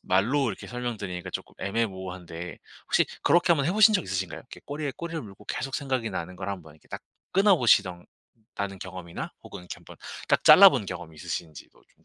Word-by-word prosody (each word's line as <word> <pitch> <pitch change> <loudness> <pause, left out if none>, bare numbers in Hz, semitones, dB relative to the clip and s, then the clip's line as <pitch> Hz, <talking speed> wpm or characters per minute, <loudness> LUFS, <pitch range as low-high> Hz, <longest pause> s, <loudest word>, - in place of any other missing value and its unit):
말로 120 +9 +2
이렇게 95 - -6
설명 120 -2 -4
드리니까 90 -3 -5
쪼끔 - - -7
애매모호한데 95 -5 -4 0.3
혹시 - - +3 0.2
그렇게 175 0 +4
한번 140 -4 +1
해 175 - +1
보신 215 +1 +6
적 - - +2
있으신가요? 95 -2 -3
이렇게 - - -13
꼬리에 145 -1 -3
꼬리를 165 -3 -5
물고 105 0 -13
계속 135 0 -4
생각이 130 -5 -2
나는 90 0 -5
걸 95 +1 -5
한번 80 -6 -8
이렇게 80 - -25
딱 - - -6 0.3
끊어보시던 120 - +4 0.5
다는 100 -1 -4
경험이나 90 -2 -7
혹은 100 - -9
이렇게 90 - -7
한번 - - -14 0.3
그러니까 - - +4
잘라 195 -1 +10
본 115 -8 -2
경험이 90 -4 -7
있으신지도 80 -1 -6 0.2
좀 - - -33
100 Hz, 470 characters per minute, -27 LUFS, 90-135 Hz, 0.5 s, 잘라